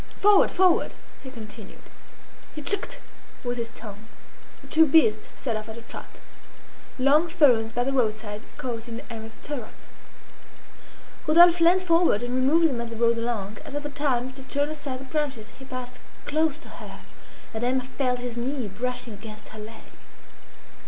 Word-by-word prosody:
"Forward! 410 Hz, -1 st, +6 dB
forward!" 370 Hz, -2 st, +3 dB, 0.3 s
he 265 Hz, -, -9 dB
continued. 220 Hz, -4 st, -10 dB, 0.7 s
He 300 Hz, -, -6 dB
"tchk'd" 405 Hz, -, 0 dB, 0.5 s
with 245 Hz, -1 st, -2 dB
his 230 Hz, 0 st, -3 dB
tongue. 210 Hz, 0 st, -10 dB, 0.6 s
The -, -, -13 dB
two 320 Hz, 0 st, +5 dB
beasts 225 Hz, -8 st, +4 dB
set 235 Hz, -5 st, -3 dB
off 215 Hz, +1 st, -5 dB
at 220 Hz, -, -7 dB
a 230 Hz, -, -10 dB
trot. -, -, -9 dB, 0.8 s
Long 285 Hz, +6 st, +4 dB
ferns 245 Hz, -9 st, +4 dB
by 245 Hz, +1 st, 0 dB
the 270 Hz, +2 st, -1 dB
roadside 215 Hz, -4 st, -1 dB, 0.2 s
caught 235 Hz, -2 st, -4 dB
in 230 Hz, 0 st, -6 dB
Emma's 225 Hz, 0 st, -7 dB
stirrup. 255 Hz, -2 st, -7 dB, 1.5 s
Rodolphe 340 Hz, +2 st, +7 dB
leant 360 Hz, +3 st, +5 dB
forward 335 Hz, -, +3 dB
and 245 Hz, 0 st, -3 dB
removed 285 Hz, +6 st, +4 dB
them 250 Hz, -6 st, -2 dB
as 235 Hz, -, -5 dB
they 230 Hz, -, -6 dB
rode 230 Hz, 0 st, +2 dB
along. 215 Hz, -3 st, -3 dB
At -, -, -8 dB
other 290 Hz, 0 st, -3 dB
times, 260 Hz, -3 st, 0 dB
to -, -, -8 dB
turn 285 Hz, +2 st, -1 dB
aside 280 Hz, -4 st, -5 dB
the -, -, -7 dB
branches, 270 Hz, -6 st, -3 dB
he 265 Hz, -, -10 dB
passed 255 Hz, -1 st, -6 dB, 0.3 s
close 310 Hz, 0 st, +1 dB
to -, -, -10 dB
her, -, -, -10 dB, 0.5 s
and 220 Hz, +1 st, -3 dB
Emma 255 Hz, +1 st, +1 dB
felt 255 Hz, -1 st, -1 dB
his 245 Hz, -1 st, -5 dB
knee 250 Hz, 0 st, -2 dB
brushing 240 Hz, +3 st, -3 dB
against 215 Hz, +1 st, -10 dB
her 215 Hz, -, -10 dB
leg. 220 Hz, +1 st, -9 dB
250 Hz, 165 wpm, -26 LUFS, 225-290 Hz, 1.5 s, Rodolphe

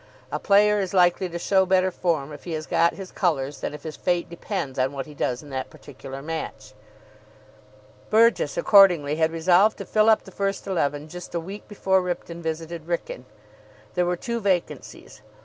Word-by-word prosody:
A -, -, -2 dB
player 210 Hz, +1 st, +4 dB
is 195 Hz, -1 st, -3 dB
likely 180 Hz, 0 st, +3 dB
to 170 Hz, -, -5 dB
show 190 Hz, +2 st, +3 dB
better 185 Hz, 0 st, +2 dB
form 155 Hz, -5 st, -1 dB
if 145 Hz, -, -12 dB
he 170 Hz, -, -4 dB
has 155 Hz, 0 st, -4 dB
got 170 Hz, +1 st, +2 dB
his 190 Hz, -2 st, -9 dB
colours 145 Hz, -7 st, -1 dB
than -, -, -3 dB
if -, -, -12 dB
his 155 Hz, -1 st, -6 dB
fate 175 Hz, -1 st, -1 dB
depends 170 Hz, -6 st, -4 dB
on 130 Hz, +2 st, +1 dB
what 135 Hz, -1 st, -4 dB
he 150 Hz, -, -12 dB
does 125 Hz, -1 st, -2 dB
in 145 Hz, -, -12 dB
that 130 Hz, -1 st, -4 dB
particular 135 Hz, 0 st, -10 dB
match. 155 Hz, -9 st, -6 dB, 1.4 s
Burgess, 230 Hz, -, +3 dB
accordingly, 180 Hz, -, +5 dB
had 160 Hz, 0 st, +2 dB
resolved 180 Hz, +6 st, +3 dB
to -, -, -7 dB
fill 215 Hz, 0 st, +3 dB
up 220 Hz, -, +4 dB
the -, -, -13 dB
first 195 Hz, 0 st, -2 dB
eleven 150 Hz, -6 st, -1 dB
just 180 Hz, +2 st, -9 dB
a -, -, +1 dB
week 195 Hz, +5 st, -9 dB
before 190 Hz, -2 st, +1 dB
Ripton 175 Hz, -1 st, -5 dB
visited 160 Hz, 0 st, -5 dB
Wrykyn. 170 Hz, -7 st, -4 dB, 0.7 s
There 180 Hz, 0 st, +1 dB
were 180 Hz, 0 st, 0 dB
two 235 Hz, +5 st, -3 dB
vacancies. 190 Hz, -5 st, -3 dB
175 Hz, 185 wpm, -24 LUFS, 155-195 Hz, 1.4 s, accordingly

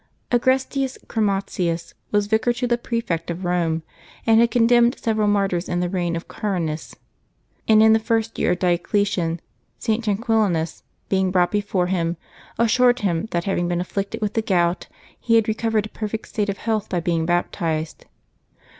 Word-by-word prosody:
aGRESTius 260 Hz, +2 st, +1 dB
Chromatius 195 Hz, -5 st, -1 dB, 0.2 s
was 205 Hz, -1 st, +2 dB
vicar 220 Hz, +3 st, +2 dB
to 245 Hz, +1 st, -2 dB
the 240 Hz, -1 st, +2 dB
prefect 230 Hz, -9 st, -3 dB
of 170 Hz, -, -2 dB
Eome, 170 Hz, -2 st, 0 dB, 0.4 s
and 225 Hz, 0 st, +5 dB
had 235 Hz, 0 st, +5 dB
condemned 240 Hz, +1 st, +4 dB
several 215 Hz, -2 st, 0 dB
martyrs 195 Hz, -3 st, +1 dB
in 175 Hz, -, 0 dB
the 175 Hz, 0 st, -1 dB
reign 175 Hz, -3 st, -1 dB
of 165 Hz, -, -6 dB
Carinas; 170 Hz, -7 st, -3 dB, 0.7 s
and 220 Hz, 0 st, +6 dB
in 220 Hz, 0 st, +7 dB
the 220 Hz, -, +4 dB
first 225 Hz, 0 st, -1 dB
years -, -, +2 dB
of -, -, -15 dB
Diocletian, 175 Hz, -1 st, +1 dB, 0.4 s
St. 225 Hz, 0 st, -1 dB
Tranquillinus, 205 Hz, -6 st, 0 dB, 0.3 s
being 190 Hz, -1 st, +1 dB
brought 180 Hz, -1 st, +2 dB
before 205 Hz, -3 st, 0 dB
him, 175 Hz, -2 st, -1 dB, 0.4 s
assured 245 Hz, +2 st, +3 dB
him 185 Hz, 0 st, 0 dB
that, 170 Hz, -4 st, -1 dB
having 175 Hz, -2 st, 0 dB
been 175 Hz, 0 st, -1 dB
afflicted 195 Hz, +3 st, -3 dB
with 210 Hz, -1 st, -1 dB
the 225 Hz, -, +1 dB
gout, 175 Hz, -4 st, +1 dB, 0.3 s
he 230 Hz, -, +2 dB
had 225 Hz, -2 st, +4 dB
recovered 220 Hz, -1 st, 0 dB
a -, -, -8 dB
perfect 215 Hz, +1 st, -5 dB
state 205 Hz, -2 st, -1 dB
of 200 Hz, -, -2 dB
health 220 Hz, -3 st, -2 dB
by 180 Hz, -, 0 dB
being 165 Hz, -1 st, 0 dB
baptized. 165 Hz, -2 st, -1 dB
200 Hz, 165 wpm, -22 LUFS, 175-225 Hz, 0.7 s, in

